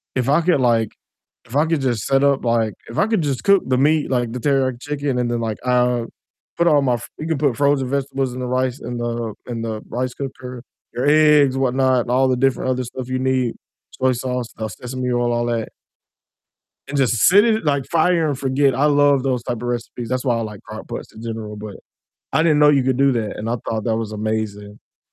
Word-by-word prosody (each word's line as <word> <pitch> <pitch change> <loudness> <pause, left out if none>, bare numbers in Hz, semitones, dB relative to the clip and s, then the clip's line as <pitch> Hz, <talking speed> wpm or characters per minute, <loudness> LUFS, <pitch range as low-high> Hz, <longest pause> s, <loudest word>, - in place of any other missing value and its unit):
if 130 0 0
I 150 +4 +4
could, 170 -3 +2
like 115 -4 +2 0.6
if 115 - -10
I 150 +2 +4
could, 165 -2 +1
just, 120 -6 -1
set 135 0 +3
up, 140 -1 +2
like 115 -3 +1 0.2
if 115 - -8
I - - +4
could, 220 -6 +1
just, 140 -4 -2
cook 200 -1 +5
the 130 - +2
meat, 150 +3 +2
like, 120 -3 0
the 125 - -4
teriyaki 130 -2 0
chicken 145 -3 -2
and 120 -1 0
then, 120 -1 -1
like, 110 -2 -3
uh, 125 -1 +2 0.5
put 170 - +2
all 150 -3 +5
my 130 -3 +1
f 115 - -7
you 155 - -4
can 160 -2 0
put 140 -4 +1
frozen 140 -2 +2
vegetables 135 -1 -2
in 125 - -6
the 125 - -3
rice, 130 +1 -1
in 120 +1 -5
the 120 -2 -3
in 120 -2 -4
the 110 -1 -4
rice 125 +2 -2
cooker, 130 -3 -7 0.3
your 125 - -2
eggs, 150 -3 +5
whatnot, 130 -1 +2
and 120 - -5
all 130 +1 +3
the 130 -1 +1
different 130 0 +1
other 130 0 -1
stuff 125 +1 -7
you 130 0 -1
need, 130 -2 0 0.4
soy 130 0 +1
sauce, 125 0 -3
uh, 110 - -3
sesame 125 +5 -5
oil, 120 0 +1
all 120 0 0
that 115 -2 -2 1.2
and, 145 - -3
just, 130 -3 +2
sit 200 +4 +6
it 225 -1 +1
like, 140 -3 0
fire 165 0 +2
and 140 -3 -2
forget. 135 0 +2
I 140 +4 +2
love 145 -2 +4
those 130 -3 -1
type 120 - -3
of - - -10
recipes. 120 -1 -4
That's 130 +1 -2
why 125 -3 +2
I - - -2
like 105 -2 -6
crock - - -9
pots - - -7
in 110 - -11
general, 110 -2 -6
but 105 -1 -8 0.6
I 160 - +3
didn't 155 -3 +3
know 150 0 +6
you 140 -3 +3
could 130 -1 0
do 140 0 +4
that, 110 -3 -3
and 110 +2 -4
I 120 - 0
thought 110 -1 -2
that 110 -2 +1
was 110 -2 -4
amazing, 110 -1 -3
and 105 +1 -18
130 Hz, 235 wpm, -20 LUFS, 120-140 Hz, 1.2 s, sit